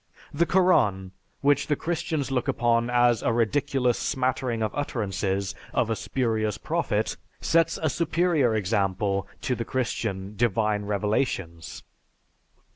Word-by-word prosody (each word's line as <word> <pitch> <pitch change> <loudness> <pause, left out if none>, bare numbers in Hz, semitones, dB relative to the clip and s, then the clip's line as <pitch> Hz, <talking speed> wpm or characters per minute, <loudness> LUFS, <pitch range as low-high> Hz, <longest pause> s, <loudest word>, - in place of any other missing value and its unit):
The 165 +4 +2
Koran, 110 - +3 0.3
which 145 0 +3
the 150 - +2
Christians 160 -3 -2
look 125 -2 0
upon 120 0 +2
as 120 -2 +3
a - - +1
ridiculous 125 +2 +1
smattering 130 -4 -1
of 110 - -2
utterances 100 -7 -2 0.2
of 115 -2 +1
a - - +1
spurious 110 -4 -1
prophet, - - -1 0.2
sets 165 0 +2
a 160 - 0
superior 160 -5 +1
example 100 -1 0
to 130 - 0
the 115 - -2
Christian 105 -5 -3
"Divine 105 -1 +1
Revelations." 100 -5 -2
115 Hz, 120 wpm, -26 LUFS, 105-135 Hz, 0.3 s, Koran